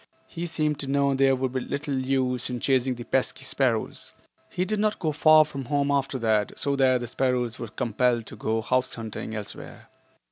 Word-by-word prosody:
He 175 0 -5
seemed 155 -2 0
to 140 - -3
know 140 0 +2
there 135 0 +3
would 130 -1 -2
be 130 - 0
little 140 +2 -4
use 130 -2 0
in 125 -1 -3
chasing 130 0 +1
the 120 - -7
pesky 130 +2 -1
sparrows. 130 -4 -1 0.4
He 180 - -1
did 210 +2 -1
not 210 0 +1
go 160 -3 -1
far 155 +1 +6
from 140 -3 -7
home 145 +1 0
after 140 -1 0
that, 110 -4 0
so 140 0 0
that 130 -2 +3
the - - -3
sparrows 125 -1 -1
were 120 - -5
compelled 120 +1 0
to - - -9
go 110 +1 -1
house 130 +2 0
hunting 110 -1 -5
elsewhere. 105 -2 -7
130 Hz, 200 wpm, -26 LUFS, 120-140 Hz, 0.4 s, far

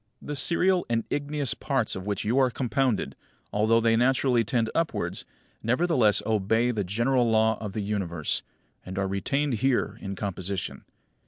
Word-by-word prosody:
20. - - -7
The - - -2
serial 180 +5 +3
and 115 -1 +1
igneous 145 -2 0
parts 135 -6 -1
of 95 +1 -6
which 100 -2 -2
you 120 +6 +2
are 130 -1 +4
compounded, 125 -2 -1 0.4
although 110 +2 +3
they 115 0 +3
naturally 125 0 +3
tend 115 0 0
upwards, 165 -1 -2 0.4
nevertheless 125 - +2
obey 110 +3 +1
the 105 -4 -1
general 120 +6 +1
law 110 0 +3
of 105 -3 -5
the 110 - -2
Universe, 95 -6 -2 0.4
and 95 +1 -8
are 100 -1 0
retained 135 +9 -1
here 120 -5 +1
in 100 0 -5
composition. 95 -1 -4
115 Hz, 160 wpm, -26 LUFS, 105-135 Hz, 0.4 s, are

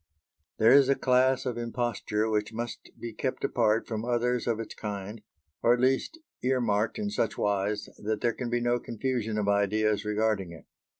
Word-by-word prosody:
There 110 +2 +5
is 135 0 +7
a 140 - +5
class 130 +1 +2
of 120 -2 -2
imposture 115 -2 -1
which 105 -1 0
must 120 +1 -6
be 115 -1 -6
kept 130 +4 -3
apart 110 -1 +2
from 110 -1 -3
others 125 0 0
of 115 -2 0
its 115 - -6
kind, 105 0 -6 0.4
or 120 - +5
at - - -6
least 130 - +1 0.2
ear 130 +1 +1
marked 110 -2 0
in 210 -1 -2
such 115 - -1
wise 100 0 0
that 110 0 -2
there 120 - +2
can 125 0 -4
be 120 0 0
no 120 0 +1
confusion 115 -2 -2
of 105 -1 0
ideas 105 +1 +2
regarding 105 -4 0
it. 80 -4 -13
115 Hz, 185 wpm, -28 LUFS, 105-125 Hz, 0.4 s, is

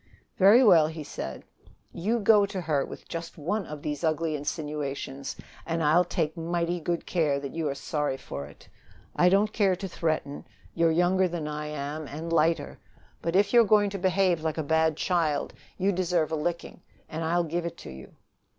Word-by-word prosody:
"Very 205 +7 +7
well," 170 -9 +6
he 160 -1 -6
said. 65 - -6 0.5
"You 220 +7 0
go 205 -1 +5
to 190 -2 -4
her 150 -4 0
with - - -10
just 165 0 -6
one 185 +6 -2
of 150 -1 -8
these 150 +2 -4
ugly 160 0 0
insinuations, 145 -2 -4 0.3
and 165 0 -2
I'll 160 +4 +5
take 165 -2 -2
mighty 170 +1 -1
good 170 +1 -2
care 150 -5 +1
that 140 -1 -7
you 160 -2 -1
are 140 - -3
sorry 145 -1 -2
for 70 - -7
it. 70 - -17 0.5
I 180 - +5
don't 205 +3 +2
care 195 -4 +3
to 195 +2 -5
threaten. 155 -5 -3 0.3
You're 165 0 +3
younger 180 +3 +3
than 170 -3 -4
I 150 0 -4
am, 150 +1 -5
and 160 +4 -5
lighter. 165 +1 +1 0.4
But 165 +1 -2
if 200 +4 +3
you 240 - +8
are - - +5
going 205 -1 +3
to 200 - -4
behave 185 -2 +2
like 160 0 -2
a 160 - -1
bad 160 +1 +2
child, 165 -5 0 0.2
you 195 +2 +2
deserve 175 -4 0
a - - +1
licking, 170 +3 -4 0.3
and 160 +1 -5
I'll 170 +2 +1
give 170 +1 -2
it 170 - -8
to - - -7
you." 65 0 -12
165 Hz, 195 wpm, -27 LUFS, 150-180 Hz, 0.5 s, you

